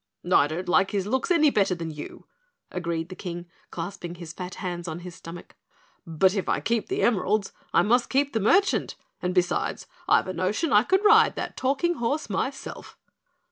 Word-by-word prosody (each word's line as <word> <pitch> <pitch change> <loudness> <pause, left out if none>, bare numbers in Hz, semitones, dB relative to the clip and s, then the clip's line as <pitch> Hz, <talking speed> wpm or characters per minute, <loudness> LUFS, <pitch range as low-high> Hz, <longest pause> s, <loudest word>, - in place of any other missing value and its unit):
"I 145 - +6
don't 165 +4 -5
like 190 +2 +3
his 200 -3 -1
looks 260 - -1
any 310 -5 +4
better 195 -5 +2
than 165 -2 -5
you," 150 -1 -9 0.5
agreed 170 -2 -3
the 185 - -8
King, 175 -2 -6 0.2
clasping 175 0 -6
his 170 -2 -9
fat 180 +1 -7
hands 175 -2 -5
on 165 +1 -5
his 180 0 -8
stomach. 170 +1 -11 0.5
"But 175 +4 +3
if 195 -3 -2
I - - +1
keep 230 -1 -1
the 385 +2 -1
emeralds 205 -2 +1 0.2
I - - +4
must 240 +3 +2
keep 280 +1 +1
the 225 - +1
merchant, 390 - +2 0.3
and 180 - -1
besides 180 -1 0 0.2
I've - - +4
a 185 - -3
notion 200 - 0
I 205 - +7
could 380 - +1
ride 435 +2 +6
that - - -5
talking 285 +6 0
horse 240 +2 -2
myself." 270 +7 -4
195 Hz, 185 wpm, -26 LUFS, 175-260 Hz, 0.5 s, I